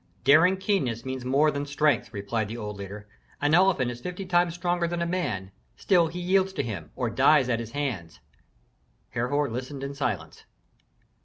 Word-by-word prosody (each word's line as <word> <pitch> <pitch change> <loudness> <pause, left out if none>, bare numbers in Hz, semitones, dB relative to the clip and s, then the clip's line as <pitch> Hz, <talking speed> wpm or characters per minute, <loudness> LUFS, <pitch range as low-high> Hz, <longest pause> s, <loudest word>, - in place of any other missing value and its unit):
"Daring 160 +8 +6
keenness 135 - -1
means 130 -1 -4
more 140 +4 +3
than 145 0 -3
strength," 145 -6 +1
replied 105 +1 -2
the 115 +3 -6
old 105 -2 -5
leader. 100 +1 -8 0.3
"An 145 +1 +1
elephant 175 -8 +4
is 120 0 -9
fifty 180 +6 -5
times 175 -1 +2
stronger 175 -1 0
than 175 0 -3
a - - -1
man; 125 - -2 0.3
still 175 -4 +3
he 175 +3 -6
yields 190 +2 +2
to - - -1
him, 95 -10 -5
or 120 -3 -2
dies 135 0 +4
at 115 -2 +1
his 115 +1 -7
hands." 120 - -4 0.9
Herhor 145 +5 0
listened 130 +3 -5
in 140 +1 -4
silence. 140 -1 -4
140 Hz, 175 wpm, -26 LUFS, 115-175 Hz, 0.9 s, Daring